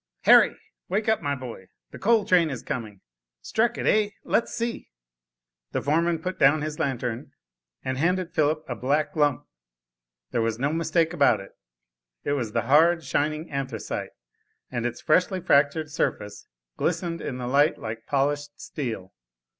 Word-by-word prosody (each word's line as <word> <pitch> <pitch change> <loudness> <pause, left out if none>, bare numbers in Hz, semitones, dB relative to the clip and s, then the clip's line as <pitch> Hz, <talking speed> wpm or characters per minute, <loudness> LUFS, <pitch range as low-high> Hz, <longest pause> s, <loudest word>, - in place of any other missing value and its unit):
"Harry, - - +6 0.3
wake 210 +4 0
up, 220 -1 +2
my 145 -1 -1
boy, 120 -8 -9 0.2
the - - -10
coal 220 -1 +3
train 175 -3 +4
is 130 -5 -5
coming. 110 -6 -5 0.4
Struck 230 +2 +1
it, - - -3
eh? 210 -1 +3
Let's 230 - +1
see?" 235 0 -4 0.8
The - - 0
foreman 165 +3 +2
put 185 0 -4
down 145 +2 +5
his 155 0 -4
lantern, 125 -5 -3 0.5
and 130 0 -2
handed 180 +2 0
Philip 155 +1 +1
a 125 - -3
black 140 +6 0
lump. 145 -4 +1 0.9
There 115 - +1
was 115 -1 0
no 140 +5 0
mistake 165 0 +1
about 140 -9 +4
it, 100 - -11 0.7
it - - -1
was 125 -7 -1
the - - +1
hard, 165 +4 +4
shining 150 +4 -1
anthracite, 135 -2 -4 0.6
and 120 -1 -1
its 120 0 -6
freshly 180 +4 +2
fractured 150 0 +2
surface, 105 -9 -3 0.3
glistened 170 0 -1
in 130 - -4
the 125 - -5
light 140 +5 +3
like 110 +1 -7
polished 145 +1 -1
steel. 115 - -5
145 Hz, 155 wpm, -25 LUFS, 130-165 Hz, 0.9 s, Harry